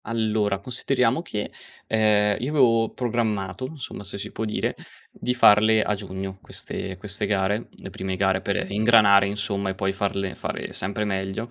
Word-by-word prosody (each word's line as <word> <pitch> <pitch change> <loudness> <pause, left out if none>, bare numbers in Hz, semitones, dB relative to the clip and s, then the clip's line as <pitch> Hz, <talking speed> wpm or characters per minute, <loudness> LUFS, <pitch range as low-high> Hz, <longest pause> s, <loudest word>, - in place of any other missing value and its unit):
Allora, 110 -3 0
consideriamo 125 +4 0
che, 105 -11 -5 0.3
ehm, 105 -2 +3
io 130 - -1
avevo 115 -6 +3
programmato, 115 -2 -2
insomma, 135 -8 -8
se 100 0 -7
si 100 - -7
può 110 - -3
dire, 105 - -1 0.4
di 125 - -3
farle 110 -1 +6
a - - 0
giugno 95 -1 -6
queste 95 -1 -5
queste 105 +1 -2
gare, 100 +2 0
le - - -11
prime 95 0 -4
gare 95 0 +1
per 100 -1 -2
ingranare, 105 -2 +5
insomma, 100 -1 -2
e 95 - -3
poi 95 0 -1
farle 100 -1 -2
fare - - -5
sempre 100 +3 -1
meglio. 95 +3 -3
105 Hz, 160 wpm, -24 LUFS, 95-115 Hz, 0.4 s, farle